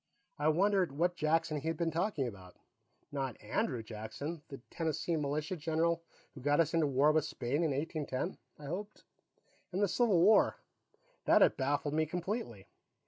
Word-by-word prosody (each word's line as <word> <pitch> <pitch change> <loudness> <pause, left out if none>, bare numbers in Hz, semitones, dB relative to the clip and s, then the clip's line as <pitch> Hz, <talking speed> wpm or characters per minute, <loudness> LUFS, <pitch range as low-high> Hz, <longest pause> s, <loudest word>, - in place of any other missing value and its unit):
I 150 - +1
wondered 185 0 +3
what 175 +2 +2
Jackson 160 -1 +1
he 160 - -5
had 165 - -1
been 170 -1 0
talking 165 -3 0
about; 95 -6 -9 0.5
not 135 -4 -3
Andrew 110 +2 -1
Jackson, 115 +9 -6
the 135 - -8
Tennessee 165 0 -1
militia 150 +4 -1
general 165 +1 0 0.3
who 135 - -10
got 145 +3 +2
us 160 -1 +3
into 165 -2 +3
war 140 +2 +4
with 155 -1 +2
Spain 145 +1 -1
in 160 - +2
1810, 145 +2 -3 0.2
I 150 - -11
hoped. 200 +8 -6 0.7
And 185 - -2
the 205 - +3
Civil 210 -3 +3
War; 205 +6 +5 0.7
that - - +6
had - - +4
baffled 145 +2 0
me 155 0 +1
completely. 170 - -4
155 Hz, 165 wpm, -33 LUFS, 140-170 Hz, 0.7 s, that